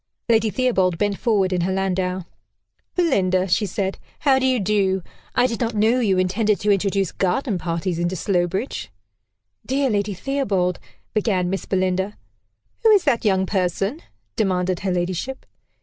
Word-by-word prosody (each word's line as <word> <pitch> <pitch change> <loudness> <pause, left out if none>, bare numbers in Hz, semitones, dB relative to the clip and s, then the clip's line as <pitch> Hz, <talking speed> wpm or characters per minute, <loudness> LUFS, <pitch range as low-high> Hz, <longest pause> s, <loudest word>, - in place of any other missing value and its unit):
Lady 225 -2 +3
Theobald 195 -8 +1
bent 205 0 0
forward 200 -6 +2
in 180 - +1
her 185 +2 0
landau. 185 -1 -1 0.7
"Belinda," 190 - +2
she 205 +3 +1
said, 190 +1 -2 0.2
"how 270 -3 +4
do 260 - +1
you 255 -2 +2
do? 195 -2 +1 0.3
I - - +4
did 230 -3 -1
not 230 -1 -1
know 220 +4 +3
you 200 -6 +2
intended 200 +3 +1
to 210 - +2
introduce 195 -1 +1
garden 195 +1 0
parties 170 +1 -2
into 175 +2 -1
Slowbridge." 180 - -1 0.7
"Dear 270 0 0
Lady 205 -1 0
Theobald" 195 -7 -1 0.3
began 190 -4 +1
Miss 195 - -3
Belinda. 190 +1 0 0.6
"Who 450 - +5
is 410 -4 +6
that 260 -6 +1
young 190 -2 +3
person?" 195 - -1 0.3
demanded 185 -3 0
her 190 0 -1
ladyship. 180 +8 -2
195 Hz, 150 wpm, -22 LUFS, 185-225 Hz, 0.7 s, is